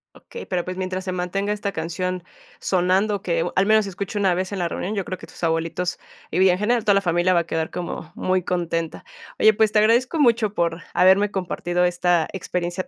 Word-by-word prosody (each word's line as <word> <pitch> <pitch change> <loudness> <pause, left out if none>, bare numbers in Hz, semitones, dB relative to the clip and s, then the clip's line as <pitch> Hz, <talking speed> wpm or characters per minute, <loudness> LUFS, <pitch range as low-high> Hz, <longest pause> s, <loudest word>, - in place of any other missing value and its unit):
Okey, 475 - -10
pero 180 -2 -2
pues, 185 - -4
mientras 185 0 -3
se 185 - -2
mantenga 190 +3 -2
esta 205 -1 -3
canción 180 +2 -3 0.4
sonando, 190 +3 +1
que 170 -1 0
al 195 - +3
menos 215 -1 +4
escucho 200 +2 -5
una 195 -3 +3
vez 185 +2 -2
en 200 - -3
la 175 - 0
reunión, 200 +5 -4
yo 195 - -2
creo 185 - -5
que - - -11
tus - - -13
abuelitos 165 +2 -1 0.3
y, 175 - 0
bien, 190 -1 +5
en 180 - -2
general, 230 +1 +1
toda 205 -2 +4
la 195 - +3
familia 175 0 +2
va 170 - +4
a 170 - -8
quedar 160 -1 -2
como 175 -1 -6
muy 185 0 0
contenta. 165 -2 -2 0.3
Oye, 220 - +6
pues 215 0 +2
te - - +1
agradezco 240 +8 +3
mucho 230 -6 +3
por 170 0 0
haberme 190 +3 +5
compartido 180 -2 -1
esta 175 -2 +2
experiencia, 180 0 -3
185 Hz, 215 wpm, -22 LUFS, 175-200 Hz, 0.4 s, Oye